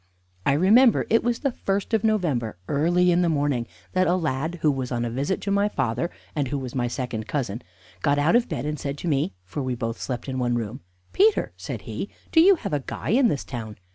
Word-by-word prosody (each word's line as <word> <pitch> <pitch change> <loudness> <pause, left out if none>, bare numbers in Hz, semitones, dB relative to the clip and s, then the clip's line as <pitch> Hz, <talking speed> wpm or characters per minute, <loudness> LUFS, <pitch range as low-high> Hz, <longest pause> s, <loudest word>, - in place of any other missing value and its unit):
I 140 - +5
remember 220 - +5
it 230 - +4
was 240 0 0
the 275 - +1
first 200 -1 -2
of 220 -1 +2
November, 155 - 0
early 175 +5 +3
in 175 +1 +3
the 175 - +2
morning, 145 -6 0 0.3
that 185 0 +3
a 175 - +3
lad, 160 -1 -1
who 150 - +5
was 130 -2 -3
on 120 -1 -1
a 115 - -3
visit 140 +10 -1
to 200 - -2
my 200 +1 +2
father, 130 - -1 0.3
and 145 -3 0
who 140 - -2
was 130 -3 -5
my 125 -2 0
second 120 -3 -4
cousin, 120 -5 -2 0.4
got 145 +7 +2
out 150 +9 +3
of 240 0 +3
bed 120 - -3
and 150 0 -3
said 140 0 -4
to 175 - -5
me 135 - 0
(for 120 +11 -5
we 130 -2 -2
both 115 -1 -4
slept 125 -1 -4
in 130 -1 -3
one 120 -1 +1
room): 120 +3 -4 0.3
"Peter," 420 +2 +3
said - - -6
he, - - -5 0.2
"do 320 - +6
you 385 +3 +7
have 205 - -5
a 145 - +2
guy - - -5
in 245 +3 +5
this 145 - -1
town? 110 -4 -7
145 Hz, 235 wpm, -25 LUFS, 125-190 Hz, 0.4 s, you